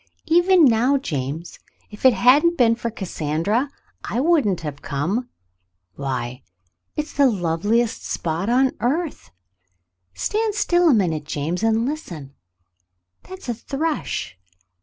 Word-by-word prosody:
Even 350 +1 +5
now, 250 +3 +3
James, 155 - -5 0.3
if 210 +4 -8
it 255 - +5
hadn't 300 +8 +4
been 230 -4 +5
for 235 0 -3
Cassandra, 190 - -2 0.3
I 235 - -2
wouldn't 275 - +2
have 150 -3 -6
come. 185 - -2 0.6
Why 130 0 -4 0.3
— 90 +2 -54
it's 300 +1 -3
the 280 -2 +4
loveliest 205 +4 0
spot 170 +5 -2
on 260 +2 +3
earth. 300 +6 -2 0.9
Stand 430 - -1
still 350 -4 +3
a - - +6
minute, 165 -7 0
James, 155 +5 -3
and 225 +1 +2
listen. 175 - -6 1.0
That's 375 -5 -9
a 240 - 0
thrush. 275 - -3
230 Hz, 125 wpm, -22 LUFS, -, 1.0 s, a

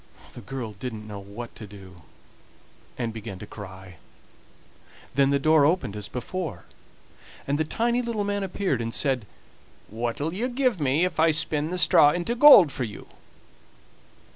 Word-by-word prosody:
The 120 - -10
girl 120 0 -6
didn't 110 0 -7
know 105 -1 -7
what 100 +4 -9
to 110 - -10
do, 95 -3 -14 1.0
and 115 -3 -3
began 110 -3 -7
to 105 - -9
cry; 95 -4 -11 1.2
then 140 0 +3
the 140 - +2
door 155 +1 +4
opened 145 - +1
as 105 -1 -5
before, 125 - -5 0.8
and 145 +2 -1
the - - +2
tiny 235 +9 0
little 230 -3 -2
man 205 0 -2
appeared 190 - -2
and 115 0 -3
said: 130 -5 0 0.6
"What'll 120 +8 -3
you 235 +7 -2
give 250 -5 0
me 145 +4 +2
if 180 -3 -4
I 165 +1 +5
spin 150 0 +1
the 180 - -3
straw 170 -4 +6
into 175 +7 -2
gold 240 - +8
for 130 - -4
you?" 105 -4 -8
140 Hz, 160 wpm, -25 LUFS, 110-180 Hz, 1.2 s, gold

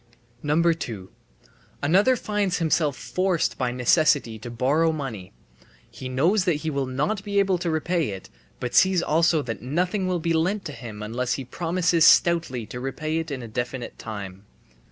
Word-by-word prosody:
2. 150 - 0 0.7
Another 195 - +4
finds 205 -5 -1
himself 155 -4 +1
forced 185 -2 -1
by 125 -1 0
necessity 125 -2 +2
to 120 - -8
borrow 140 +8 +2
money. 130 -12 -6 0.6
He 130 - -7
knows 170 +11 +2
that 175 -4 +2
he 160 - 0
will 140 -2 -1
not 150 +11 -1
be 200 -1 -3
able 195 -2 +3
to 175 -1 -2
repay 160 -1 0
it, 95 -2 -7 0.3
but 125 -1 -4
sees 190 -2 +4
also 160 -1 +2
that 115 -2 -5
nothing 180 - -1
will 180 -1 0
be 165 0 -1
lent 185 +6 0
to - - -4
him 110 -6 -8
unless 120 +4 -2
he 135 - -4
promises 170 +3 +1
stoutly 165 -9 +4
to 125 - -7
repay 155 +5 -2
it 165 - -4
in 135 -4 -5
a - - -7
definite 120 +2 -5
time. 100 -3 -7
155 Hz, 170 wpm, -24 LUFS, 125-175 Hz, 0.7 s, Another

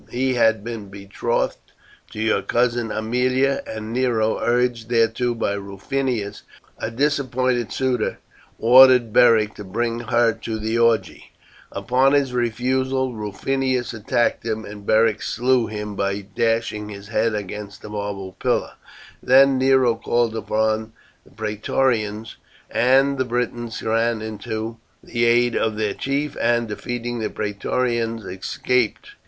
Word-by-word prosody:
He 130 +1 0
had 110 -3 +2
been 115 -3 -6
betrothed 100 +4 -3 0.4
to - - -9
your 110 0 +1
cousin 120 -1 0
Aemilia, 125 +5 +1
and 110 0 -6
Nero, 120 -3 +1
urged 120 -1 0
thereto 120 +1 +1
by 105 -3 -1
Rufinus, 100 +2 -3 0.4
a - - -3
disappointed 130 -2 0
suitor, 130 -2 -1 0.4
ordered 125 -1 +6
Beric 110 -3 +5
to 105 - -7
bring 115 +4 -2
her 120 0 +2
to 110 0 -5
the 110 +1 -2
orgy. 115 -5 +1 0.4
Upon 130 +2 +2
his 140 -3 +2
refusal 130 +2 0
Rufinus 125 +4 -2
attacked 115 +2 0
him, 110 -1 -3
and 105 0 -10
Beric 110 -1 +3
slew 125 -1 +1
him 105 -1 -5
by 100 +1 -1
dashing 115 0 -1
his 100 0 -10
head 115 0 +1
against 105 0 -6
a - - -8
marble 100 -2 -5
pillar. - - 0 0.5
Then 135 +1 +5
Nero 130 -2 +4
called 115 0 0
upon 110 0 -1 0.3
the - - -21
Praetorians, 110 +1 -1 0.3
and 135 +2 +3
the 130 - +1
Britons 120 -1 -3
ran 115 0 0
in 110 -2 -6
to 110 +2 -4 0.3
the 120 0 -1
aid 120 +1 +3
of 110 -1 0
their 105 -2 -1
chief, 140 +2 -2
and, 120 -1 +2
defeating 120 +2 -4
the 110 - -2
Praetorians, 115 +2 -2
escaped. 125 - -1
115 Hz, 135 wpm, -22 LUFS, 110-125 Hz, 0.5 s, ordered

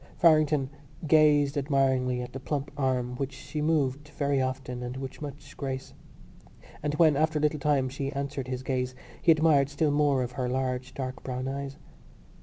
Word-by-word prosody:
Farrington 155 -4 +4 0.3
gazed 150 -2 +4
admiringly 130 -3 +1
at 125 - -9
the 135 - -5
plump 140 +1 -3
arm 130 -3 0
which 135 0 -3
she 150 +3 -5
moved 150 -2 +1
very 140 -2 0
often 130 -1 -3
and 125 +1 -5
with 135 +1 -7
much 145 0 -8
grace; 135 -1 -5 0.9
and 150 0 -1
when, 155 -2 +5
after 155 +2 +2
a - - 0
little 150 0 +2
time, 140 -2 +2
she 135 +1 -4
answered 140 -2 -4
his 130 0 -4
gaze 130 -1 -1 0.3
he 170 - +6
admired 155 -3 +4
still 145 +1 +1
more 145 -3 +2
her 125 0 -3
large 130 0 -2
dark 130 -1 -4
brown 130 0 -4
eyes. 140 +1 -4
140 Hz, 170 wpm, -28 LUFS, 130-150 Hz, 0.9 s, he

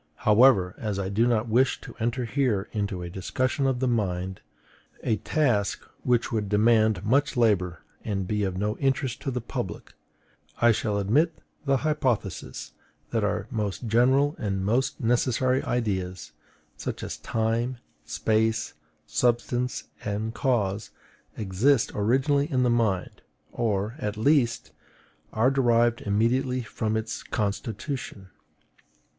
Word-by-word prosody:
However, 105 -4 +5
as 105 -3 -2
I 95 -1 -2
do 110 +4 +2
not 120 -1 +1
wish 125 +4 +2
to - - -10
enter 120 +2 -1
here 115 -6 0
into 100 -4 -2
a 85 - -5
discussion 130 +8 -1
of 130 -2 0
the 130 - +1
mind, 95 -5 -1 0.6
a 110 - +1
task 120 -10 0
which 120 0 +1
would 105 -3 -1
demand 110 -2 +3
much 140 +5 +2
labor 95 -7 +2 0.2
and 100 -4 -2
be 105 +1 0
of 95 -2 -2
no 105 +2 -1
interest 135 -2 0
to 140 - -2
the 125 -1 -2
public, - - -5 0.6
I 120 0 +5
shall 105 -1 0
admit 145 - +2 0.3
the 135 -1 +3
hypothesis 130 - -1 0.4
that - - 0
our - - 0
most 105 -1 -3
general 130 +6 +3
and 95 -2 -2
most 120 +6 +1
necessary 125 +2 +2
ideas 95 -6 -2 0.5
such - - -5
as - - -5
time, 115 +3 -1 0.3
space, 110 0 0 0.3
substance, 120 0 0 0.2
and 105 +2 -2
cause 105 -5 0 0.5
exist 110 +6 +2
originally 135 +8 +1
in 130 -2 +2
the 125 - +3
mind; 110 -6 0 0.3
or, 105 -1 -1
at 105 -4 -3
least, 120 -1 +2 0.6
are 115 +5 +3
derived 120 -3 +3
immediately 125 +5 +1
from 110 -1 -2
its 110 0 -4
constitution. 105 0 -4
115 Hz, 130 wpm, -26 LUFS, 105-125 Hz, 0.6 s, However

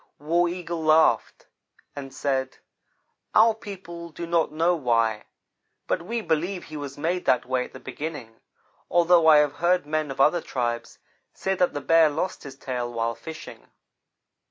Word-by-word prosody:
War 170 +4 +1
Eagle 170 -2 -5
laughed 155 +1 +3 0.5
and 135 -2 -7
said: 130 -1 -2 0.8
"Our 225 +1 +6
people 185 -6 -9
do 170 +1 -7
not 165 -2 +1
know 165 +3 +2
why, 115 -7 0 0.6
but 180 - -1
we 230 +7 -3
believe 175 +2 -1
he - - -10
was 145 -2 -6
made 175 +4 -2
that 125 - +2
way 130 0 -1
at - - -15
the - - -9
beginning, 130 -5 -7 0.5
although 170 -1 +4
I 155 -1 +8
have 150 -1 +2
heard 175 -1 +2
men 155 0 -1
of 135 - -7
other 155 +5 +4
tribes 120 -4 -3 0.4
say 190 - -1
that 180 -2 +1
the 145 - -3
Bear 165 +2 +5
lost 165 +6 -3
his 140 -3 -10
tail 125 -3 -4
while 115 0 -1
fishing. 155 - -10
155 Hz, 160 wpm, -25 LUFS, 135-175 Hz, 0.8 s, I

